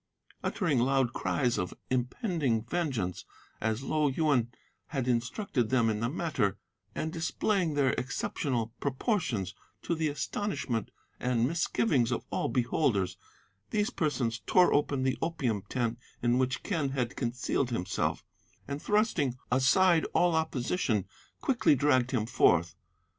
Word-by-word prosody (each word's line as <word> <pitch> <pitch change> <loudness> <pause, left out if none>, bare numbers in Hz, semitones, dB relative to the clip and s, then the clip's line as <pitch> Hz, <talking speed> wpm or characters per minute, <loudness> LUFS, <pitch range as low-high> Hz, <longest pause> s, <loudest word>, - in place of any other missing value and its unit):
Uttering 160 - +1
loud 130 -1 +2
cries 125 -3 0
of 90 - -3
an - - -22
impending 130 - 0
vengeance, 125 - -2 0.4
as 110 +3 -1
Lo 150 +1 +1
Yuen 135 -4 +1 0.4
had 135 -5 -2
instructed 120 - 0
them 120 -4 +3
in 105 - -2
the 115 +1 0
matter, 130 - 0 0.4
and 160 - -3
displaying 170 0 0
their 135 -3 +3
exceptional 125 -2 -2
proportions 135 - -1 0.3
to - - -1
the 160 -1 0
astonishment 145 - -2 0.3
and 120 -1 +1
misgivings 155 - +1
of 120 - -2
all - - 0
beholders, 120 - +1 0.5
these 210 +2 0
persons 130 - -1
tore 180 -1 +5
open 145 -2 +1
the 130 0 0
opium 135 -11 -1
tent 120 -2 -1 0.2
in 120 +1 +3
which 130 +1 0
Quen 160 -9 0
had 130 -3 -2
concealed 125 +1 -1
himself, 115 -7 -1 0.4
and, 140 +1 -4
thrusting 195 - +1
aside 160 +7 +4
all 175 -1 +4
opposition, 130 - 0 0.4
quickly 235 - +3
dragged 130 -3 +3
him 115 -5 0
forth. 90 -7 +3
130 Hz, 130 wpm, -30 LUFS, 120-160 Hz, 0.5 s, tore